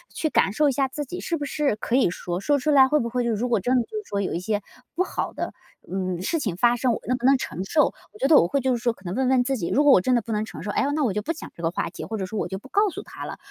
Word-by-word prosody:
去 315 Hz, -, 0 dB
感 195 Hz, -, +2 dB
受 295 Hz, +5 st, +3 dB
一 -, -, +2 dB
下 270 Hz, +1 st, +1 dB
自 295 Hz, +3 st, -5 dB
己 350 Hz, +6 st, -7 dB
是 335 Hz, -, -2 dB
不 290 Hz, -, -4 dB
是 285 Hz, -3 st, 0 dB
可 230 Hz, +4 st, 0 dB
以 250 Hz, -, +4 dB
说， 175 Hz, 0 st, -4 dB
说 290 Hz, +8 st, +2 dB
出 295 Hz, +3 st, 0 dB
来 265 Hz, -2 st, +7 dB
会 300 Hz, -, +3 dB
不 235 Hz, -, -2 dB
会 245 Hz, 0 st, -1 dB
就 235 Hz, -, +1 dB
是 220 Hz, -, 0 dB
说 205 Hz, -, -4 dB
如 245 Hz, -, 0 dB
果 230 Hz, -4 st, +2 dB
真 245 Hz, +7 st, +1 dB
的 250 Hz, -, +4 dB
就 -, -, -19 dB
是 425 Hz, -, -4 dB
说 200 Hz, 0 st, -1 dB
有 190 Hz, -, -2 dB
一 170 Hz, -, -1 dB
些 205 Hz, +2 st, -1 dB, 0.3 s
不 365 Hz, -, +2 dB
好 -, -, -3 dB
的， -, -, -4 dB, 0.4 s
嗯， 185 Hz, -2 st, -2 dB
事 325 Hz, -, 0 dB
情 205 Hz, -, -2 dB
发 240 Hz, +6 st, +3 dB
生， 245 Hz, 0 st, +1 dB
我 -, -, -4 dB
能 255 Hz, -, +2 dB
不 245 Hz, -, -4 dB
能 270 Hz, 0 st, +6 dB
承 185 Hz, -8 st, -5 dB
受。 300 Hz, +9 st, +2 dB, 0.2 s
我 -, -, -14 dB
觉 -, -, +2 dB
得 310 Hz, -, +8 dB
我 170 Hz, -, +5 dB
会 280 Hz, +7 st, 0 dB
就 260 Hz, 0 st, +1 dB
是 -, -, -10 dB
说 240 Hz, -1 st, +1 dB
可 195 Hz, -, -22 dB
能 175 Hz, -1 st, -4 dB
问 265 Hz, 0 st, +1 dB
问 255 Hz, -1 st, +4 dB
自 270 Hz, +1 st, -1 dB
己， 170 Hz, -, -3 dB
如 290 Hz, -, +3 dB
果 290 Hz, -, +6 dB
我 225 Hz, -, +7 dB
真 250 Hz, +7 st, +2 dB
的 235 Hz, -, +2 dB
不 230 Hz, -, -7 dB
能 215 Hz, 0 st, 0 dB
承 220 Hz, -, -9 dB
受， 205 Hz, -, -3 dB
哎 -, -, +1 dB
呀， 275 Hz, -, +1 dB
那 305 Hz, -, +1 dB
我 235 Hz, -, +2 dB
就 210 Hz, +2 st, -2 dB
不 330 Hz, +7 st, -2 dB
讲 320 Hz, -, -10 dB
这 170 Hz, -, -12 dB
个 165 Hz, -, +1 dB
话 -, -, -2 dB
题， -, -, -7 dB
或 220 Hz, -, -5 dB
者 190 Hz, -, -2 dB
说 210 Hz, +3 st, -4 dB
我 -, -, -1 dB
就 190 Hz, -, -5 dB
不 210 Hz, -, -13 dB
告 410 Hz, +5 st, +3 dB
诉 330 Hz, -, -7 dB
他 -, -, -8 dB
了， -, -, -6 dB
245 Hz, 400 characters per minute, -24 LUFS, 205-280 Hz, 0.4 s, 得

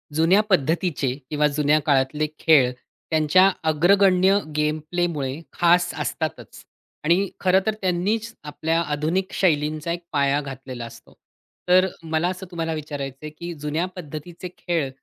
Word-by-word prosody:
जुन्या 170 Hz, +6 st, +4 dB
पद्धतीचे 160 Hz, -5 st, +1 dB, 0.2 s
किंवा 150 Hz, 0 st, +2 dB
जुन्या 150 Hz, +1 st, +2 dB
काळातले 145 Hz, +2 st, +1 dB
खेळ, 140 Hz, -6 st, +5 dB, 0.4 s
त्यांच्या 160 Hz, +4 st, +4 dB, 0.2 s
अग्रगण्य 190 Hz, +4 st, +4 dB, 0.2 s
गेम 150 Hz, +1 st, 0 dB
प्लेमुळे 160 Hz, -5 st, -2 dB
खास 175 Hz, +1 st, +3 dB
असतातच 160 Hz, -1 st, -4 dB, 0.4 s
आणि 175 Hz, +5 st, +2 dB
खरं 185 Hz, 0 st, +4 dB
तर 220 Hz, -, +1 dB
त्यांनीच 200 Hz, +5 st, -1 dB
आपल्या 160 Hz, +2 st, -1 dB
आधुनिक 160 Hz, +5 st, -1 dB
शैलींचा 155 Hz, -2 st, 0 dB
एक 170 Hz, +1 st, -4 dB
पाया 140 Hz, 0 st, +2 dB
घातलेला 135 Hz, -3 st, -7 dB
असतो. 115 Hz, 0 st, -14 dB, 0.6 s
तर 185 Hz, +1 st, +6 dB
अ, -, -, -2 dB
मला 160 Hz, +1 st, 0 dB
असं 185 Hz, +1 st, -6 dB
तुम्हाला 165 Hz, -1 st, -2 dB
विचारायचंय 145 Hz, -1 st, -6 dB
की 170 Hz, 0 st, -6 dB
जुन्या 150 Hz, +4 st, -1 dB
पद्धतीचे 170 Hz, +1 st, -8 dB
खेळ 165 Hz, -6 st, -1 dB
160 Hz, 130 wpm, -23 LUFS, 150-180 Hz, 0.6 s, तर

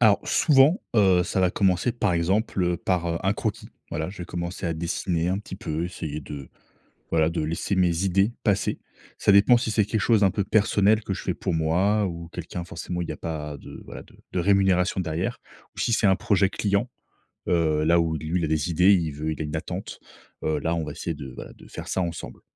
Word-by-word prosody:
Alors, 110 Hz, -4 st, +5 dB
souvent, 150 Hz, -, +4 dB
heu, 95 Hz, -4 st, +5 dB
ça 95 Hz, -, -1 dB
va 90 Hz, -, +3 dB
commencer, 95 Hz, +5 st, +1 dB
par 105 Hz, -5 st, 0 dB
exemple, 95 Hz, +4 st, 0 dB
heu, 90 Hz, -1 st, +1 dB
par, 90 Hz, -1 st, -1 dB
heu, 85 Hz, 0 st, -1 dB
un 95 Hz, -, +2 dB
croquis. -, -, -4 dB, 0.2 s
Voilà, 80 Hz, +4 st, -3 dB
je 100 Hz, -, -12 dB
vais 90 Hz, -, -5 dB
commencer 85 Hz, +1 st, -4 dB
à 85 Hz, -, -1 dB
dessiner 85 Hz, +1 st, -1 dB
un 95 Hz, +2 st, 0 dB
petit 100 Hz, -2 st, -8 dB
peu, 85 Hz, -5 st, -3 dB
essayer 75 Hz, -4 st, -5 dB
de 70 Hz, -2 st, -8 dB, 0.6 s
voilà, 80 Hz, -1 st, +3 dB
de 85 Hz, -, -2 dB
laisser 80 Hz, +5 st, -2 dB
mes 90 Hz, 0 st, +2 dB
idées 95 Hz, +4 st, +2 dB
passer. 100 Hz, -3 st, +1 dB, 0.4 s
Ça -, -, +4 dB
dépend 100 Hz, +5 st, +6 dB
si 115 Hz, -, -2 dB
c'est 105 Hz, -1 st, +2 dB
quelque 110 Hz, +1 st, -1 dB
chose 110 Hz, +2 st, +3 dB
d'un 100 Hz, -2 st, +4 dB
peu 100 Hz, +1 st, -1 dB
personnel, 105 Hz, 0 st, +3 dB
que 95 Hz, -, -2 dB
je 95 Hz, -, -7 dB
fais 90 Hz, -, -1 dB
pour 90 Hz, -1 st, -2 dB
moi, 95 Hz, +6 st, +2 dB
ou 85 Hz, -2 st, -6 dB
quelqu'un. 90 Hz, 0 st, -6 dB
Forcément, 85 Hz, +1 st, -5 dB
il 85 Hz, -, -4 dB
n'y -, -, -4 dB
a -, -, -7 dB
pas 75 Hz, -3 st, -5 dB
de -, -, -11 dB
voilà, -, -, -8 dB
de -, -, -21 dB, 0.2 s
de -, -, -1 dB
rémunération 95 Hz, -1 st, +3 dB
derrière. 80 Hz, -2 st, -2 dB, 0.4 s
Ou, -, -, -5 dB
si 115 Hz, -, +1 dB
c'est 105 Hz, -, +2 dB
un 95 Hz, -, +4 dB
projet 95 Hz, +1 st, +2 dB
client, 100 Hz, +5 st, 0 dB, 0.6 s
heu, 80 Hz, -3 st, +2 dB
là 85 Hz, +2 st, +4 dB
où 80 Hz, -1 st, 0 dB
lui, 80 Hz, +4 st, -2 dB
il -, -, -1 dB
a -, -, -1 dB
des 80 Hz, +2 st, 0 dB
idées, 90 Hz, +4 st, +5 dB
il 85 Hz, -5 st, 0 dB
veut 75 Hz, +2 st, -3 dB
il 80 Hz, -, -7 dB
a -, -, -3 dB
une 75 Hz, +1 st, -5 dB
attente, -, -, -6 dB, 0.4 s
heu, 80 Hz, -1 st, +1 dB
là, 80 Hz, +4 st, 0 dB
on 85 Hz, -, -1 dB
va 75 Hz, -, -5 dB
essayer 85 Hz, +3 st, -4 dB
de 70 Hz, -4 st, -8 dB
voilà, -, -, -9 dB
de -, -, -16 dB
faire -, -, -8 dB
ça -, -, -1 dB
ensemble. 85 Hz, -2 st, -6 dB
90 Hz, 235 wpm, -25 LUFS, 80-100 Hz, 0.6 s, dépend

